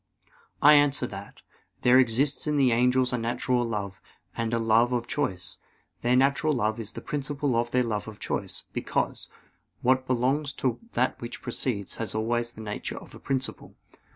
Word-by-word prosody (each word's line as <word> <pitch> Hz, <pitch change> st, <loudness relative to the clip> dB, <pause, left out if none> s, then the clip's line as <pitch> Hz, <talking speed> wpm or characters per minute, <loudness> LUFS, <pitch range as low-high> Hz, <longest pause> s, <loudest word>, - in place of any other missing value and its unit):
I 150 Hz, +1 st, +9 dB
answer 145 Hz, -3 st, +4 dB
that, 100 Hz, -3 st, -9 dB, 0.4 s
There 125 Hz, +1 st, +6 dB
exists 130 Hz, +5 st, +1 dB
in 150 Hz, -1 st, +1 dB
the 135 Hz, -3 st, +4 dB
angels 125 Hz, +2 st, +3 dB
a 125 Hz, -, 0 dB
natural 120 Hz, +1 st, 0 dB
love, 100 Hz, -4 st, -4 dB, 0.3 s
and 115 Hz, -1 st, -1 dB
a 115 Hz, -, +1 dB
love 115 Hz, +2 st, +3 dB
of 120 Hz, -1 st, 0 dB
choice. 120 Hz, -13 st, -3 dB, 0.4 s
Their 120 Hz, +1 st, +3 dB
natural 140 Hz, +4 st, +3 dB
love 110 Hz, -3 st, 0 dB
is 110 Hz, 0 st, -5 dB
the -, -, -7 dB
principle 145 Hz, -2 st, -1 dB
of 120 Hz, +1 st, +1 dB
their 125 Hz, +1 st, +2 dB
love 110 Hz, -3 st, -2 dB
of 110 Hz, -1 st, -9 dB
choice; -, -, -3 dB
because, -, -, -2 dB, 0.5 s
what 130 Hz, +1 st, +3 dB
belongs 135 Hz, +3 st, +1 dB
to 130 Hz, -3 st, -1 dB
that -, -, 0 dB
which 120 Hz, -, -6 dB
precedes, 115 Hz, -4 st, -3 dB
has 115 Hz, -1 st, -3 dB
always 120 Hz, +2 st, -1 dB
the 110 Hz, -, -10 dB
nature 105 Hz, -1 st, -5 dB
of -, -, -11 dB
a -, -, -11 dB
principle. 135 Hz, -1 st, -3 dB
120 Hz, 175 wpm, -27 LUFS, 115-130 Hz, 0.5 s, I